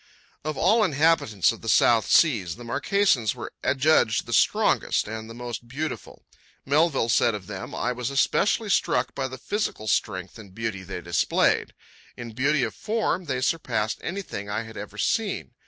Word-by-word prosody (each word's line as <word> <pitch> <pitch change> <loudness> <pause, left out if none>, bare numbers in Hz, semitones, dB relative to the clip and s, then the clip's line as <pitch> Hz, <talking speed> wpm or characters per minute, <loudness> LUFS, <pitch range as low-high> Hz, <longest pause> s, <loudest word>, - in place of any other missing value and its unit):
Of 155 -1 -3
all 215 +8 +4
inhabitants 145 - +2
of - - -9
the - - -4
South 115 -2 +4
Seas, 110 - +3
the 120 - -11
Marquesans 125 - +1
were - - -8
adjudged 130 -4 +2
the - - -5
strongest - - +2
and 110 +1 -6
the 115 - -9
most 120 0 -6
beautiful. 140 +4 -6 0.4
Melville 145 -3 +2
said 115 -1 +3
of 100 -3 -8
them: 95 -1 -7
"I 125 - -1
was 125 0 -3
especially 200 +9 +1
struck - - +1
by 135 -1 -2
the 130 0 -8
physical 140 - -3
strength 95 +1 -1
and 100 -3 -13
beauty 110 -4 -3
they 95 -1 -7
displayed... 85 -3 +1 0.4
In 120 -1 -7
beauty 135 +4 +1
of 110 -3 -2
form 210 - -1
they 130 -4 -2
surpassed 120 -7 -1
anything 175 - -5
I 105 +2 -2
had 110 0 -11
ever 105 0 -8
seen. 210 - -1
120 Hz, 170 wpm, -25 LUFS, 110-155 Hz, 0.4 s, all